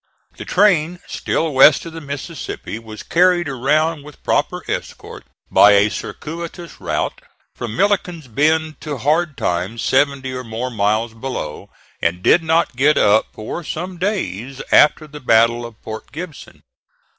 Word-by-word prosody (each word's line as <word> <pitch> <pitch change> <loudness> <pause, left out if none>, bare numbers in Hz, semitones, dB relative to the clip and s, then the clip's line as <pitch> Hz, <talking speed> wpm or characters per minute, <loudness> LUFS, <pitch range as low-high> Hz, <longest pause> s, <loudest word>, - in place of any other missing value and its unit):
The - - -7
train 180 -4 +2
still 160 -2 -1
west 135 +4 +6
of 165 - -8
the 165 - -7
Mississippi 140 -5 -6
was 110 -1 -10
carried 175 -1 +3
around 150 +4 +1
with 150 -1 -14
proper - - 0
escort, - - -6 0.2
by 105 - +7
a 100 +1 +4
circuitous 170 +2 -7
route - - -2 0.3
from 115 -2 -6
Milliken's 180 - 0
Bend 155 +5 +1
to 150 -3 -4
Hard 155 +3 0
Times 90 +6 -2
seventy 135 -1 +1
or 125 0 -5
more 115 +2 -4
miles 110 +1 0
below, 115 - -6 0.3
and 90 +2 -1
did 175 - +5
not 160 -4 +1
get 140 +4 +3
up 105 +1 +4
for 110 +10 -6
some 175 +3 -5
days 135 - -3
after 155 +1 +5
the 150 0 -10
battle 115 -1 +3
of 115 -2 -16
Port 110 0 -8
Gibson. 160 -2 -9
140 Hz, 145 wpm, -19 LUFS, 115-165 Hz, 0.3 s, by